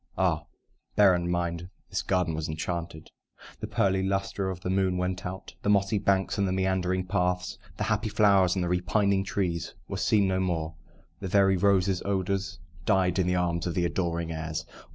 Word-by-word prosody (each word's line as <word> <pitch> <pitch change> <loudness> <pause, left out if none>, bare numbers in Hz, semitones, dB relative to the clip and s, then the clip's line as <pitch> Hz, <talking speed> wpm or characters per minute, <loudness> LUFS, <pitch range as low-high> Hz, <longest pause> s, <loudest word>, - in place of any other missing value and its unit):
(Ah, - - +1 0.5
bear 100 -3 +6
in 85 0 -1
mind 85 0 -2 0.2
this 95 -2 0
garden 90 -2 0
was 80 0 -3
enchanted!) 80 +1 -4 0.5
The - - -4
pearly 95 -1 +1
lustre 95 0 -1
of 90 -1 -5
the 90 - -3
moon 95 -1 +1
went 90 0 -2
out: 95 +1 -8
The - - -1
mossy 100 +1 +3
banks 100 0 +1
and 100 - +2
the - - -1
meandering 95 -1 0
paths, 90 +1 -1 0.2
The - - -1
happy 110 0 0
flowers 100 -4 +4
and 95 - 0
the - - -1
repining 95 +3 +1
trees, 90 -4 -2
Were - - -4
seen 105 -3 +3
no 95 0 +1
more: 80 -4 -1 0.5
the 95 - -4
very 95 0 +4
roses' 95 -1 +2
odours 95 0 -1 0.3
Died 95 -1 +2
in 90 - +2
the 90 - +2
arms 85 -1 0
of 85 - -3
the 90 - +1
adoring 85 -2 -1
airs. 80 0 -4
95 Hz, 185 wpm, -28 LUFS, 85-95 Hz, 0.5 s, bear